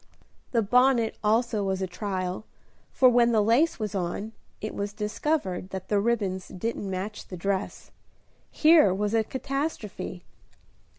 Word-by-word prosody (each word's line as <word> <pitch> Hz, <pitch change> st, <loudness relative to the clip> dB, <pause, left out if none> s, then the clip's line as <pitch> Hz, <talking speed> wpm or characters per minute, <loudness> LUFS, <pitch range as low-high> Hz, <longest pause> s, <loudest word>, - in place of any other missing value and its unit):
The 230 Hz, -3 st, +2 dB
bonnet 245 Hz, +1 st, +3 dB
also 220 Hz, 0 st, +2 dB
was 190 Hz, -1 st, -1 dB
a 190 Hz, -, -1 dB
trial, 185 Hz, 0 st, -4 dB, 0.5 s
for 260 Hz, -, +5 dB
when 240 Hz, -1 st, +4 dB
the 215 Hz, -2 st, +4 dB
lace 245 Hz, +10 st, +3 dB
was 215 Hz, -3 st, -3 dB
on, 195 Hz, +3 st, -3 dB, 0.3 s
it 215 Hz, -, -5 dB
was 200 Hz, 0 st, -4 dB
discovered 210 Hz, -, -2 dB
that 190 Hz, -1 st, -7 dB
the 205 Hz, -, +3 dB
ribbons 200 Hz, -4 st, -1 dB
didn't 200 Hz, +1 st, -4 dB
match 190 Hz, +3 st, -5 dB
the 180 Hz, -, -7 dB
dress. 195 Hz, +2 st, -3 dB, 0.6 s
Here 310 Hz, -, +5 dB
was 205 Hz, +2 st, -1 dB
a 225 Hz, -1 st, +3 dB
catastrophe! 260 Hz, -, -4 dB
210 Hz, 140 wpm, -27 LUFS, 190-235 Hz, 0.6 s, for